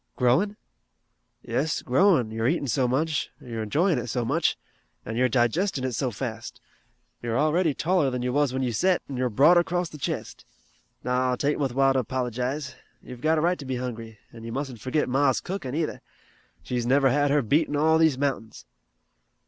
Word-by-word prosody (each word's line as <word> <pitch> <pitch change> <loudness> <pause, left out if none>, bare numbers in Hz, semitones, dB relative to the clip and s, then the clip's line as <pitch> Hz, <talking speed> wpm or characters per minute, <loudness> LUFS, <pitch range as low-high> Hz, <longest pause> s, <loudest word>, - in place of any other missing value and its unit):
"Growing?" 150 +12 +2 0.9
"Yes, 130 +6 -1
growin', 130 - +3
you're 115 +1 -1
eatin' 155 +1 0
so 130 0 +1
much, 150 +4 0
you're 120 -5 -6
enjoyin' 150 - +1
it 120 - -5
so 120 0 -2
much, - - +1 0.5
an' 115 - -5
you're 125 +2 +2
digestin' 130 - +1
it 130 - -1
so 125 +2 -1
fast. 115 0 -6 0.6
You 120 - -5
are - - +1
already 155 +1 +2
taller 170 -4 +1
than 125 -1 -3
you 125 0 -1
was 145 -1 +2
when 130 +1 -2
you 120 -2 -1
set, 180 - +1
an' 140 - -6
you're 125 0 0
broader 155 +10 +5
'cross 175 0 -2
the 150 - -11
chest. - - -4 0.6
No, 125 0 +1
'tain't 145 +3 0
wuth 135 -4 -1
while 135 0 +4
to 130 -1 +1
'pologize. 130 +3 -3 0.3
You've 125 -1 -10
got 160 +2 +2
a - - +1
right 175 +2 +1
to - - -7
be 130 -1 -3
hungry, 115 -3 -6 0.2
an' 115 -1 -11
you 115 - -6
mustn't 130 -3 -5
forget 130 +6 0
Ma's 135 0 +2
cookin' 175 -8 -5
either. 160 -1 -2 0.6
She's 120 +2 -2
never 135 0 +4
had 145 +2 +2
her 145 0 +2
beat 145 +8 +2
in 145 - -3
all 160 +2 +3
these 160 -5 +3
mountains." 130 - -3
130 Hz, 195 wpm, -25 LUFS, 125-150 Hz, 0.9 s, broader